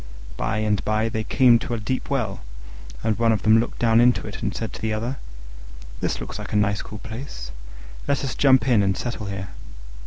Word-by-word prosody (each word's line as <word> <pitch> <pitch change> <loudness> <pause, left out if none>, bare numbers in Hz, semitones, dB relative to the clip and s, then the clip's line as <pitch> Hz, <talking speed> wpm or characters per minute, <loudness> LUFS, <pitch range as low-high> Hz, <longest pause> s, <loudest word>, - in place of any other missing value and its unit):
By 110 - -1
and 105 -2 0
by 110 +1 +1
they 110 0 -2
came 120 0 +5
to 120 - -3
a - - -4
deep 130 +4 -3
well, 135 -5 -1 0.6
and 110 0 0
one 115 -1 +4
of 110 - 0
them 110 +1 +6
looked 115 - -2
down 115 0 +4
into 125 0 +3
it, 105 - -7
and 105 - -1
said 115 0 -5
to - - -8
the 110 - -1
other, 115 +5 -2 0.8
"This - - -1
looks - - -6
a - - -5
nice 100 -1 +2
cool 105 - -8
place: 115 +5 -7 0.6
let 140 0 +1
us 130 - -3
jump 135 -1 +4
in 120 -5 +4
and 95 -2 +1
settle 120 -4 -4
here." 95 -1 -5
110 Hz, 210 wpm, -23 LUFS, 105-120 Hz, 0.8 s, them